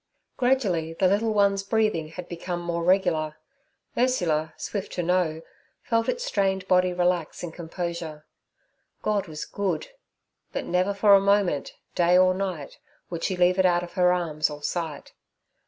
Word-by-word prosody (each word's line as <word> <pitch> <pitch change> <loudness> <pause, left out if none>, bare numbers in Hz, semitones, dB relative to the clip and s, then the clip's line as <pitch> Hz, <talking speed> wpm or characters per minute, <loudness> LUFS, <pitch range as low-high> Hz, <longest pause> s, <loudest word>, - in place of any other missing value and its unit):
Gradually 205 -11 +1
the 185 +3 +2
little 210 +4 +2
one's 200 -2 +3
breathing 215 -6 0
had 175 +2 -8
become 175 0 -4
more 170 -1 -3
regular. 170 -4 +2 0.6
Ursula, 175 -11 +1
swift 200 -2 -5
to 175 - -2
know, 165 -2 0 0.4
felt 230 -1 +1
its - - -2
strained 190 - 0
body 180 0 +3
relax 175 -2 0
in 175 - -4
composure. 165 -2 -5 0.8
God 210 -3 0
was 155 -2 -6
good! 200 - -2 0.6
but - - -3
never 185 +3 +1
for 200 0 +5
a 195 - +7
moment, 200 -7 +1 0.2
day 175 +1 +4
or 185 0 +5
night, 185 -6 -4 0.3
would 170 -1 -4
she 185 - -1
leave 180 +1 +3
it 190 - +4
out 175 0 +2
of 175 - -9
her 180 -1 +4
arms 165 -4 0
or 150 0 -9
sight. 160 -3 -4
180 Hz, 155 wpm, -26 LUFS, 165-195 Hz, 0.8 s, a